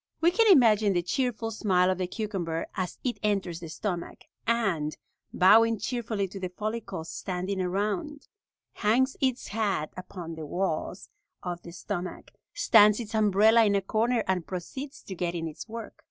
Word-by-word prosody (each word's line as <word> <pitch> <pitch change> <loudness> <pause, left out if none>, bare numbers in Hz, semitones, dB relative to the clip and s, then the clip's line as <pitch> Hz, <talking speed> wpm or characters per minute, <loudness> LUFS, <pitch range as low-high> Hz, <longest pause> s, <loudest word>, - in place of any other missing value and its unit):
We 340 +1 +4
can 450 +2 +5
imagine 220 - +5
the 175 -1 +1
cheerful 230 +2 -1
smile 185 -4 +2
of 185 - -2
the 185 - -1
cucumber 180 -6 -3
as 185 -1 -3
it 250 -2 -2
enters 195 -5 -1
the 165 -2 -8
stomach, 175 +2 -4 0.3
and, 195 -10 0 0.3
bowing 225 +4 +5
cheerfully 220 -3 -2
to 195 - -8
the 185 -1 -3
follicles 200 -3 -5
standing 185 +1 -3
around, 205 +10 -2 0.5
hangs 250 +5 +2
its 260 -2 0
hat 200 -8 -1
upon 180 -2 -7
the 160 -1 -7
walls 180 +1 -3 0.3
of 175 -1 -4
the 170 - -10
stomach, 180 0 -5 0.2
stands 210 +1 +6
its 230 -1 -6
umbrella 215 +2 +5
in 205 -2 +3
a 200 - +2
corner, 230 +4 +1
and 185 -3 0
proceeds 265 - -6
to 195 - -7
get 175 -1 -2
in 165 -1 -2
its 160 +8 -9
work. 230 0 -7
200 Hz, 165 wpm, -28 LUFS, 180-225 Hz, 0.5 s, stands